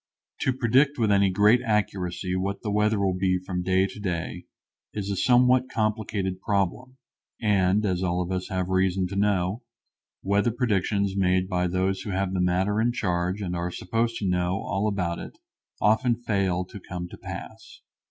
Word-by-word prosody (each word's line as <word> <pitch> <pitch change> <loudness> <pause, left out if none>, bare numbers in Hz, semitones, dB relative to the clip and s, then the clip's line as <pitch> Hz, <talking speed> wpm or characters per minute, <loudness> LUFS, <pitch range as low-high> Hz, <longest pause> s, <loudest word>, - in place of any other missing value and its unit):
To 130 - +1
predict 130 +3 +2
with 110 -4 +2
any 100 -1 +4
great 105 +6 +4
accuracy 95 -4 -1
what 100 +2 -2
the 105 - -2
weather 105 0 +2
will 95 -2 +1
be 90 0 +1
from 90 0 -4
day 95 +1 +2
to 100 - -8
day 90 -5 -4 0.5
is 100 -1 -3
a - - -1
somewhat 125 +3 +4
complicated 105 -5 -2
problem, 105 +6 -1 0.4
and, 100 -1 +2
as 90 -2 0
all 90 -1 0
of 90 0 -2
us 95 0 -3
have 95 -1 -2
reason 95 0 +1
to 100 - -6
know, 100 +1 +1 0.6
weather 100 +4 +2
predictions 100 -4 0
made 95 -1 +2
by 90 -1 0
those 95 +2 0
who 105 - -6
have 95 0 -1
the 95 - 0
matter 95 +4 +1
in 120 +1 +2
charge 90 -2 -1
and 90 -2 -3
are 85 +1 -2
supposed 115 +6 -1
to 100 - -2
know 90 +1 0
all 100 +2 -1
about 90 -5 -1
it - - -9 0.4
often 115 +4 +3
fail 100 -6 -1
to 100 - -10
come 90 -1 -6
to - - -10
pass. - - -9
95 Hz, 180 wpm, -26 LUFS, 90-105 Hz, 0.6 s, any